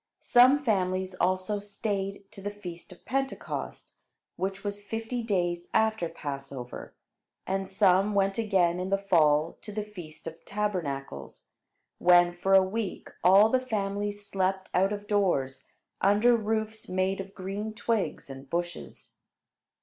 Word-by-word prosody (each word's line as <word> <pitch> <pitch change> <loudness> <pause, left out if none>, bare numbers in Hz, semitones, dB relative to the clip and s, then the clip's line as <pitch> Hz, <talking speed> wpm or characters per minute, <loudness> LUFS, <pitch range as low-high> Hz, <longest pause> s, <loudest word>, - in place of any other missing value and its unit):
Some 255 +4 +6
families 185 -5 0
also 185 +3 0
stayed 200 -1 -3
to 195 - -11
the 205 - -3
feast 185 -3 -9
of 180 - -15
Pentecost, 270 +1 -4 0.4
which 195 +1 -3
was 205 0 -4
fifty 225 +3 -4
days 175 -5 -1
after 220 -6 +2
Passover; 140 -4 -7 0.5
and 195 0 -2
some 195 +1 +3
went 195 +1 +2
again 185 -5 +2
in 185 +1 -3
the 195 - +2
fall 160 -5 +2
to 210 - -9
the 210 0 -3
feast 175 -7 -11
of 165 0 -8
Tabernacles, 145 - -4 0.6
when 175 0 +6
for 190 +2 +2
a 190 - +7
week 200 +1 -4
all 195 +4 +7
the 255 +2 +2
families 205 -3 -3
slept 190 -1 -1
out 190 +2 +3
of 205 0 -4
doors, 140 -11 0 0.4
under 210 +5 +5
roofs 220 0 -2
made 185 +1 0
of 195 +1 -11
green 200 +3 -4
twigs 215 -5 -2
and 135 0 -10
bushes. 175 0 -5
195 Hz, 140 wpm, -28 LUFS, 175-210 Hz, 0.6 s, a